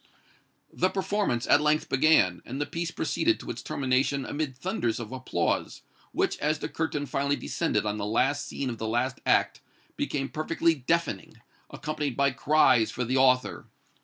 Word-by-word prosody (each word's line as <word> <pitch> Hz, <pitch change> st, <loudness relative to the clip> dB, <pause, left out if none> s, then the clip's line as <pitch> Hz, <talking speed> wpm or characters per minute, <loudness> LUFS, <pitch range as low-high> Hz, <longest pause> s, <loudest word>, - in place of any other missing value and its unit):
The 185 Hz, -, +1 dB
performance 195 Hz, -, -1 dB
at 145 Hz, -, +5 dB
length 150 Hz, +1 st, +2 dB
began, 130 Hz, -, +3 dB
and 130 Hz, +3 st, -6 dB
the 145 Hz, -, 0 dB
piece 170 Hz, +3 st, -3 dB
proceeded -, -, 0 dB
to -, -, -6 dB
its -, -, -7 dB
termination 135 Hz, 0 st, 0 dB
amid 145 Hz, -3 st, -3 dB
thunders 135 Hz, -, -2 dB
of 110 Hz, -2 st, -7 dB
applause, 130 Hz, -1 st, -2 dB, 0.3 s
which, -, -, 0 dB
as 150 Hz, +1 st, +1 dB
the -, -, -5 dB
curtain 155 Hz, -3 st, -2 dB
finally 140 Hz, +1 st, 0 dB
descended 110 Hz, -12 st, -1 dB
on 105 Hz, 0 st, -2 dB
the 100 Hz, -, -2 dB
last 135 Hz, +6 st, +1 dB
scene 135 Hz, -2 st, -3 dB
of 115 Hz, -, -7 dB
the 110 Hz, -, -3 dB
last 120 Hz, +4 st, -1 dB
act, -, -, +2 dB, 0.4 s
became 135 Hz, -2 st, -2 dB
perfectly 165 Hz, +2 st, +1 dB
deafening, 155 Hz, -, -2 dB, 0.3 s
accompanied 150 Hz, -4 st, -4 dB
by 140 Hz, 0 st, +3 dB
cries 130 Hz, -4 st, +3 dB
for 125 Hz, -, -3 dB
the 130 Hz, +3 st, 0 dB
author. 130 Hz, -1 st, +2 dB
140 Hz, 165 wpm, -27 LUFS, 125-155 Hz, 0.4 s, at